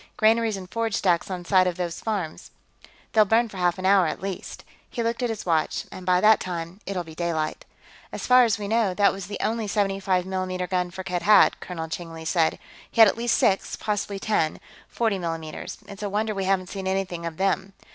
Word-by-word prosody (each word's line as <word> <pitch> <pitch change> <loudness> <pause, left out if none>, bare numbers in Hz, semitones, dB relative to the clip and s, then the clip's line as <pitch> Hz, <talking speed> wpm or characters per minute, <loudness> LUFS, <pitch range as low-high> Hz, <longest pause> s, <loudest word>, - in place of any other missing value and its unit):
"Granaries 220 -1 +3
and 185 -1 -8
forage 225 +2 -2
stacks 175 -2 +1
on 180 -2 -5
some 185 0 +4
of 180 -1 -2
these 175 -2 -3
farms. 195 -8 -4 0.6
They'll 215 - +6
burn 225 +3 +2
for 200 - -10
half 175 -1 +1
an 185 - -5
hour, 190 -2 +5
at 155 - -3
least." 195 -2 -6 0.3
He 235 - -3
looked 230 +2 -1
at 245 - 0
his 220 -2 -4
watch. 160 -3 0
"And 185 -1 -9
by 180 0 +4
that 215 0 +6
time, 175 +1 -5
it'll 190 -2 -2
be 160 -1 -12
daylight." 160 -2 -2 0.5
"As - - -5
far 250 0 +7
as 225 -4 +2
we 205 -1 -5
know, 215 -3 +1
that 200 0 +4
was 195 -2 -7
the 205 - -5
only 220 0 -1
75 195 -3 0
mm 185 -1 -3
gun 180 -1 0
Firkked 180 0 -4
had," 210 0 +5
Colonel 165 -3 -5
Cheng 165 +1 -6
Li 160 0 -9
said. 165 -1 +2 0.3
"He - - -6
has 220 -3 +9
at - - -13
least 235 0 +1
six, 195 - +1
possibly 205 -1 -2
ten, 195 -6 0 0.3
40 220 -4 0
mm's. 165 -2 -5
It's 200 0 -10
a 205 - -2
wonder 215 +2 -1
we 195 -1 -2
haven't 185 -1 +1
seen 195 -2 -5
anything 190 -3 -2
of 160 -1 -7
them." 195 0 0
190 Hz, 215 wpm, -25 LUFS, 175-210 Hz, 0.6 s, has